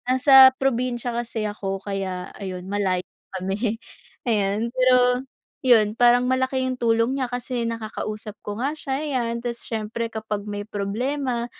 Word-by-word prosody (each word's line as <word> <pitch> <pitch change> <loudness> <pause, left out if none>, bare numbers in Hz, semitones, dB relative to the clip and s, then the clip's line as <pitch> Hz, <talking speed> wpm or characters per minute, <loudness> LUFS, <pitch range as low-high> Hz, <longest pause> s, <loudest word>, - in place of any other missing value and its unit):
Nasa 265 +1 +8
probinsiya 245 -2 -1
kasi 235 -2 -3
ako 195 -2 -3
kaya 190 -2 -4
ayun 185 -2 -6
malayo 190 -2 -1 0.3
kami 205 +4 -2 0.5
ayan. 215 0 0
Pero 250 -1 +4 0.4
yun, 225 -5 +4
parang 245 +1 +4
malaki 260 +1 +1
yung 260 - -1
tulong 230 0 +1
niya 255 - -1
kasi 245 -1 -2
nakakausap 215 -1 -5
ko 205 0 -5
nga 270 +5 -1
siya, 275 -3 -3
ayan, 245 -5 -2
tapos 235 -1 -3
siyempre 225 +1 -4
kapag 215 -2 -4
may 205 0 -4
problema 235 +5 -2
235 Hz, 140 wpm, -23 LUFS, 210-255 Hz, 0.5 s, Nasa